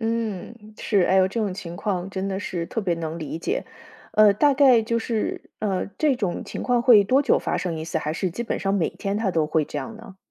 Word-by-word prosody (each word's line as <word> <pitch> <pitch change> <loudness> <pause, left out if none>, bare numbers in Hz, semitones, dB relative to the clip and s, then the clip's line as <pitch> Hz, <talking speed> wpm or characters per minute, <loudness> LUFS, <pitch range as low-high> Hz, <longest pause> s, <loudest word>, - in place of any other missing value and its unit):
嗯， 225 -2 -2 0.2
是。 205 -3 +1
哎 190 - +3
哟， 190 0 +4
这 230 - -4
种 205 -3 -1
情 175 -2 -7
况 190 -2 -2
真 190 0 -4
的 195 0 -3
是 175 -4 -3
特 225 - -3
别 180 -4 0
能 165 0 -5
理 160 0 -5
解。 440 - -2 0.5
呃， 215 -1 +6
大 290 +6 +4
概 265 -4 +6
就 230 +1 0
是， 225 -1 -2 0.2
呃， 195 -4 -1
这 300 -3 +3
种 195 -7 -2
情 - - -6
况 245 -1 +2
会 230 -5 +7
多 260 +7 +3
久 285 - +3
发 - - -2
生 170 -3 -3
一 160 - -5
次， 165 0 -2
还 155 0 -3
是 180 +2 -2
基 235 - -4
本 - - -3
上 195 - -1
每 175 -5 +1
天 200 +1 -3
他 215 -3 0
都 160 -3 +1
会 155 0 +1
这 145 - -5
样 145 +11 -6
呢？ 205 -4 -13
195 Hz, 270 characters per minute, -24 LUFS, 175-230 Hz, 0.5 s, 会